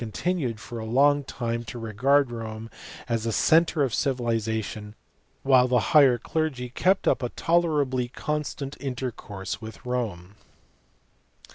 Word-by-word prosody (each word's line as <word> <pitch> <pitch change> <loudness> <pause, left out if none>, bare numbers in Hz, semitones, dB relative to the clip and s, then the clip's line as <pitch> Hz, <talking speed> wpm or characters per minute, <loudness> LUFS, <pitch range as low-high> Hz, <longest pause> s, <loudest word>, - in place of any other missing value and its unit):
139 110 - -6
continued 150 -12 -1
for 120 +2 -7
a - - -5
long 140 +5 +3
time 115 -3 -3
to 115 +1 -8
regard 125 +5 +2
Rome 115 -1 -6 0.4
as 115 -2 -1
the 115 - 0
centre 160 +4 +3
of 130 -4 -1
civilization, 110 -4 -2 0.5
while 130 -2 +5
the 125 0 +3 0.2
higher 140 -5 +7
clergy 135 -3 -2
kept 185 +9 +1
up - - +3
a 125 - -2
tolerably 150 -8 +1
constant 145 +1 -4
intercourse 125 -7 -5
witji 110 +1 -11
Rome. 105 -7 -3
125 Hz, 135 wpm, -26 LUFS, 115-140 Hz, 0.5 s, higher